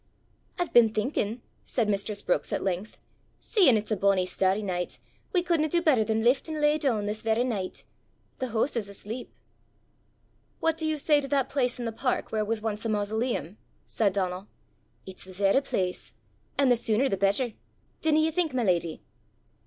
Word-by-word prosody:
"I've 355 -2 -2
been 235 -2 +7
thinkin'," 220 +1 -2 0.2
said 235 -4 0
mistress 200 0 -1
Brookes - - 0
at - - -1
length, 190 +3 -3 0.4
"seein' 355 - +4
it's 210 +1 -4
a - - +3
bonnie 195 -1 +2
starry 190 +3 +1
nicht, 180 -3 -3 0.3
we 360 -3 +2
couldna 330 -3 +1
do 345 - +2
better 300 -9 +3
than 220 0 0
lift 255 +6 +2
an' 310 -1 -3
lay 300 +1 +3
doon 235 -8 +1
this 210 +1 -3
varra 225 +2 +1
nicht. 210 -7 -3 0.6
The 260 - -1
hoose 235 +4 0
is 215 -4 -2
asleep." 215 +5 -7 1.3
"What 325 -1 +2
do 320 -1 -1
you 310 -1 0
say 295 0 +3
to 275 - -5
that 275 -2 +1
place 250 -3 +1
in 245 - -4
the 230 - -1
park 250 +3 -2
where 215 -1 0
was 215 0 -2
once 215 -1 -2
a 225 - -1
mausoleum?" 210 - -2 0.3
said 205 -4 +1
Donal. 185 0 -2 0.6
"It's 190 -1 -8
the 185 - -11
varra 195 +7 +3
place! 185 - -3 0.4
an' 275 -1 +4
the 245 - +6
sooner 230 +3 +1
the 195 - 0
better 200 +5 +1 0.5
dinna 310 -1 +3
ye 320 +1 +2
think, 320 -4 0
my 250 - +1
leddy?" 170 -5 0
225 Hz, 185 wpm, -27 LUFS, 200-275 Hz, 1.3 s, been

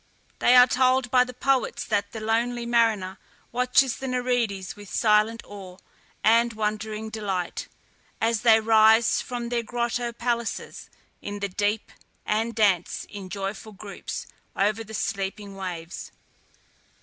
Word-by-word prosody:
We - - +1
are 250 0 +10
told 255 -1 +2
by 250 -1 +6
the 250 - -7
poets 265 -1 0
that 205 -2 -1
the 225 - -6
lonely 235 +2 0
mariner 220 -5 +1 0.3
watches 250 +1 +2
the 265 - -5
Nereides 245 -7 -1
with 205 -2 -12
silent 215 +1 +2
awe 190 -3 -10 0.5
and 230 +2 +4
wondering 215 0 -3
delight, 195 -5 -3 0.5
as 225 -1 +1
they 225 -2 +6
rise 220 +1 +5
from 240 -1 -5
their 240 -1 0
grotto 240 +1 -2
palaces 235 -1 -3 0.3
in 205 0 -5
the 200 0 -3
deep, 205 +3 -1 0.3
and 225 +2 0
dance, 195 -6 +1
in 200 -2 -8
joyful 200 +2 -5
groups, 200 0 -7 0.3
over 205 +2 +1
the 220 0 -9
sleeping 195 0 -3
waves. 175 -3 -6
220 Hz, 135 wpm, -25 LUFS, 205-235 Hz, 0.5 s, are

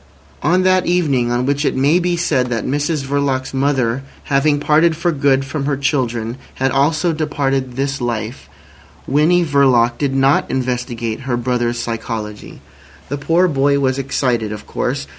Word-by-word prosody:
On 180 +6 +2
that 185 -1 +3
evening 145 -9 +1
on 120 +1 0
which 140 +2 0
it - - 0
may 140 +6 +3
be 175 -1 0
said 140 -7 +1
that 115 -3 -2
Mrs 145 +2 -1
Verloc's 135 -1 -1
mother 135 -3 0 0.2
having 145 +1 +2
parted 155 +2 +3
for 175 +1 +1
good 135 -2 +2
from 140 0 -4
her 140 -1 0
children 120 -4 -1 0.2
had 135 0 0
also 155 +5 +1
departed 135 -4 -1
this 135 0 -2
life, 115 - -4 0.6
Winnie 165 +6 +3
Verloc 130 -5 +3
did 140 -2 0
not 135 +1 +2
investigate 125 -3 -2
her 130 -2 -2
brother's 120 -1 -1
psychology. 115 -2 -5 0.5
The 145 +1 -3
poor 165 +5 +2
boy 140 -2 +2
was 135 -1 0
excited, 125 -5 -1
of 105 - -7
course. - - -3
135 Hz, 160 wpm, -18 LUFS, 125-145 Hz, 0.6 s, that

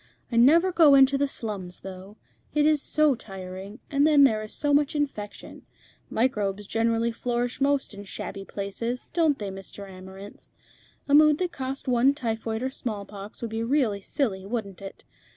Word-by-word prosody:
I - - -2
never 320 +10 +5
go 320 -5 +6
into 270 0 +6
the 285 +1 +1
slums, 200 -9 -5
though. 190 +2 -10 0.4
It 300 0 +4
is 305 -2 +3
so 305 -1 +3
tiring, 195 -1 -8
and 285 +1 +4
then 295 -2 +6
there 220 -5 +4
is 215 - -7
so 290 -1 0
much 290 +1 +2
infection. 275 -9 -5 0.4
Microbes 210 -4 0
generally 230 +2 +1
flourish 245 +2 -2
most 280 -4 +1
in 200 0 -9
shabby 195 0 -6
places, 210 +6 -5
don't 320 -4 +2
they, 205 -2 -5
Mr. 195 +1 -9
Amarinth? 190 +2 -12 0.6
A 280 - 0
mood 300 0 +7
that 360 0 -2
cost 265 -1 -5
one 255 +3 +3
typhoid 225 -3 -3
or 260 - -1
smallpox 205 -3 -6
would 230 - -4
be 225 0 -2
really 230 -5 +1
silly, 195 -4 -2
wouldn't 200 -3 -5
it? 195 0 -9
230 Hz, 170 wpm, -26 LUFS, 200-280 Hz, 0.6 s, mood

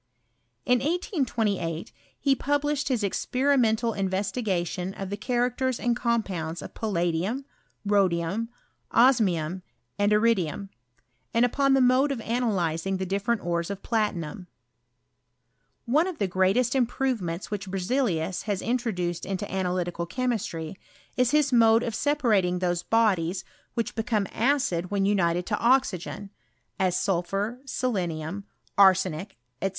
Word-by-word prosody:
In 250 -1 +4
1828 235 - -1 0.3
ho 275 -1 +5
published 290 0 0
his 250 -6 0
experimental 235 +1 +1
investi 195 +4 -1
gation 180 -1 -2
of 195 0 -5
the - - -1
cliaractera 245 +3 0
and 240 -1 0
compounds 190 -10 -2
of - - -9
palla 175 -6 0
dium, 205 +12 -2 0.4
rhodium, 195 +1 +1 0.4
osmium, 190 -9 +3 0.4
aud 205 0 +3
iridium; 205 -4 +1 0.7
and 235 +1 +5
upon 275 +2 +2
the 270 - +4
mode 255 +3 +4
of 270 - -2
analyzing 195 -7 0
the 190 - -3
di£ferent_ores 190 -3 -1
of 200 -1 -6
platinum. 185 -7 -2 1.4
One 300 +9 +3
of 365 -4 -5
the 200 - 0
greatest 190 +7 +2
improvemeats 240 -9 -1
which 200 -2 -4
Berzelius 190 -3 -1
lias 200 -3 -1
introduced 215 -8 -1
into 195 +1 -4
analytical 180 -2 -1
chemistry, 195 -8 -3 0.4
is 250 -1 +3
his 295 -1 +2
mods 230 -1 +5
of 230 - -3
separating 215 -10 +2
those 175 -1 0
bodies 190 -5 +1 0.3
which 230 - -1
became 220 -3 0
acid 235 -9 +1
when 200 -1 +1
unitf^ 175 -3 +1
to 210 - -1
oxygen, 210 -6 +1 0.5
as 185 -2 +2
sulphur, 195 +5 -1
selenium, 190 - -2 0.3
arsenic, 190 - +3 0.3
&c. 195 - +2
205 Hz, 125 wpm, -26 LUFS, 180-245 Hz, 1.4 s, ho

